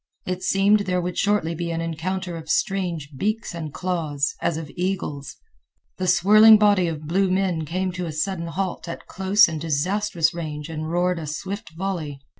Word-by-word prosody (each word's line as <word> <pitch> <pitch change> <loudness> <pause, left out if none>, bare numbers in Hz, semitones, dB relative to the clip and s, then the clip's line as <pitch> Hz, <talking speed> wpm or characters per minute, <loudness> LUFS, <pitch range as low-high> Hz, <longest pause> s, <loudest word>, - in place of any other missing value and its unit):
It 185 0 -3
seemed 195 +3 +3
there 185 -3 0
would 180 0 -3
shortly 200 -5 +1
be 170 +1 -4
an 165 0 -2
encounter 170 +2 -3
of 160 -1 -9
strange 170 -5 -1
beaks 215 - -2
and 160 -3 -5
claws, 155 -5 -1
as 165 - 0
of 160 -3 -7
eagles. 175 -6 -3 0.6
The 185 - -1
swirling 210 +5 +7
body 205 -4 +4
of 155 -2 -5
blue 190 +5 +1
men 185 -4 0
came 185 +4 -2
to 180 -1 -4
a - - -4
sudden 170 +2 -2
halt 185 +1 -3
at 170 - -7
close 195 +3 +4
and 160 -2 -5
disastrous 165 +2 0
range 155 -2 -5
and 155 0 -4
roared 175 +1 +1
a 155 - -6
swift 195 +8 -5
volley. 170 -7 -3
175 Hz, 180 wpm, -23 LUFS, 160-190 Hz, 0.6 s, swirling